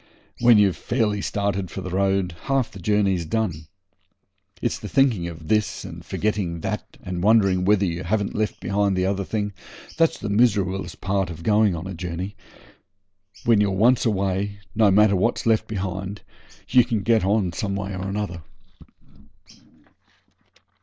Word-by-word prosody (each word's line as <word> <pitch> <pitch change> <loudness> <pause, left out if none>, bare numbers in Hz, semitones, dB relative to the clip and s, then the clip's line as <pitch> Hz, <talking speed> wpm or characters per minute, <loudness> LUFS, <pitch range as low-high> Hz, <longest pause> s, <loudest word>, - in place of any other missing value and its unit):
When 120 -2 +6
you've 100 -3 +3
fairly 110 -4 0
started 100 -3 -2
for 95 - -6
the 90 -1 -6
road 95 -2 0
half 135 -3 0
the 100 - -11
journey's 95 -1 +1
done. 80 -4 -2 0.9
It's 120 - -2
the 105 - -7
thinking 120 -10 +2
of 80 -2 -9
this 105 +1 0
and - - -9
forgetting 100 -6 -2
that, - - -5
and 90 -1 -4
wondering 100 -3 +3
whether 100 0 +3
you 85 0 -3
haven't 100 +3 -1
left 110 0 -2
behind 100 0 0
the 90 - +1
t'other 100 +1 0
thing, 105 0 -3 0.4
that's 165 -1 +3
the - - -5
miserablest 100 -3 +1
part 95 -1 0
of 85 -1 -8
going 105 -1 +3
a 90 +3 -6
journey; 90 +3 -5 1.1
when 115 -3 +4
you're 100 - +2
once 115 +6 +3
away, 100 -1 -1 0.2
no 105 -1 +4
matter 100 +1 +5
what's 115 +6 0
left 110 -2 +2
behind, 95 -1 -4 0.5
you 125 0 +5
can 115 -4 -2
get 115 0 +3
on 95 -2 +1
some 100 +2 -2
way 100 0 -4
or 95 +2 -4
other. 90 -5 -4
100 Hz, 155 wpm, -23 LUFS, 95-105 Hz, 1.1 s, When